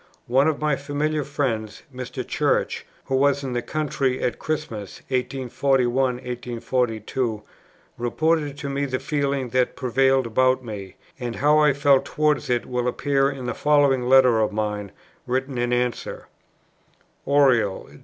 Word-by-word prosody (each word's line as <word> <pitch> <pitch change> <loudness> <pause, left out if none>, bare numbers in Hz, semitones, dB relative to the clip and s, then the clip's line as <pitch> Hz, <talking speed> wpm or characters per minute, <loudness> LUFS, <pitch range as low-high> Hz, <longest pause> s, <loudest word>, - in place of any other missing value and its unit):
One 135 +5 +3
of 155 -2 0
my 150 -2 +1
familiar 150 +2 -1
friends, 125 -7 -3
Mr. 125 0 -6
Church, - - 0 0.2
who 135 - -1
was 140 +1 +2
in 130 -2 -3
the 120 - -1
country 140 -3 -1
at 120 - -1
Christmas, 130 -10 -4
1841 130 -1 0 0.9
2, 115 -5 -2 0.6
reported 150 +4 0
to 145 - -5
me 140 +1 -1
the 130 -2 -2
feeling 140 -2 -1
that 125 +1 +1
prevailed 130 +1 +2
about 130 +3 +2
me; 100 -4 -7 0.2
and 120 -2 -4
how 150 +2 +4
I 150 -2 +5
felt 140 -1 +3
towards 150 -2 0
it 120 -1 +1
will 125 -1 -2
appear 135 +2 +1
in 135 -3 -6
the 120 - -2
following 140 -4 +2
letter 130 -3 +6
of 110 - +1
mine, 105 -2 -3 0.4
written 130 +1 -1
in 120 0 0
answer: 125 0 -2 1.0
"Oriel, 130 -8 +3
Dec. - - -15
130 Hz, 145 wpm, -23 LUFS, 120-140 Hz, 1.0 s, letter